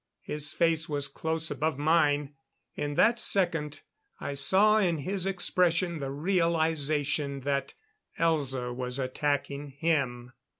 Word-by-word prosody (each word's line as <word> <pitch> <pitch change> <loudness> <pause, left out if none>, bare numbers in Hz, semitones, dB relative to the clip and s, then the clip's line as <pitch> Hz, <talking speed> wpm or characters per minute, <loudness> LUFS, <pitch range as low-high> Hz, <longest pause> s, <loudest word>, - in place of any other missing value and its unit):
His 150 -1 -2
face 165 -1 +1
was 145 -1 0
close 160 0 -2
above 150 +1 -1
mine. 145 -2 +2 0.4
In 145 0 -3
that 230 +7 +4
second, 165 -6 0 0.4
I 140 - -4
saw 200 +10 +4
in 175 -5 +1
his 185 +6 -2
expression 180 -2 +1
the 135 -1 -4
realization 155 -3 0
that 140 0 -2 0.4
Elza 135 -7 0
was 125 0 -3
attacking 140 +2 -2
him. 130 -6 -1
150 Hz, 120 wpm, -28 LUFS, 140-170 Hz, 0.4 s, that